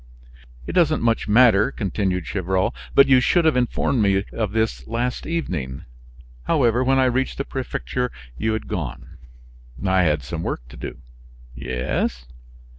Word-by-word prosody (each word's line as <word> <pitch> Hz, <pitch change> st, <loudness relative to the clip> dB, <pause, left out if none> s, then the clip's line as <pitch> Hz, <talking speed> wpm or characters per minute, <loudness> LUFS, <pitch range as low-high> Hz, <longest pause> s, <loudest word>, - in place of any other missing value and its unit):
"It -, -, -4 dB
doesn't 160 Hz, -6 st, +2 dB
much 115 Hz, -1 st, +1 dB
matter," 110 Hz, -2 st, +5 dB
continued 95 Hz, -3 st, -2 dB
Gevrol; 95 Hz, +4 st, -1 dB, 0.2 s
"but 140 Hz, -, +8 dB
you 130 Hz, -1 st, +5 dB
should 170 Hz, +7 st, +2 dB
have 160 Hz, -, +4 dB
informed 125 Hz, 0 st, +1 dB
me 100 Hz, -1 st, +2 dB
of 110 Hz, -4 st, -2 dB
this 105 Hz, -, -1 dB
last 125 Hz, +2 st, -2 dB
evening. 85 Hz, -, -3 dB, 0.6 s
However, 120 Hz, +1 st, +2 dB
when 135 Hz, +1 st, +3 dB
I 130 Hz, -, +4 dB
reached 130 Hz, +1 st, 0 dB
the 140 Hz, -, -2 dB
prefecture 125 Hz, -1 st, -3 dB, 0.2 s
you 110 Hz, -, -1 dB
had 110 Hz, -, -4 dB
gone." -, -, -6 dB, 0.7 s
"I 95 Hz, 0 st, +3 dB
had 75 Hz, -4 st, +1 dB
some 80 Hz, +6 st, -5 dB
work -, -, -4 dB
to -, -, -12 dB
do." -, -, -7 dB, 0.6 s
"Yes?" 60 Hz, -1 st, -2 dB
110 Hz, 150 wpm, -22 LUFS, 90-125 Hz, 0.7 s, but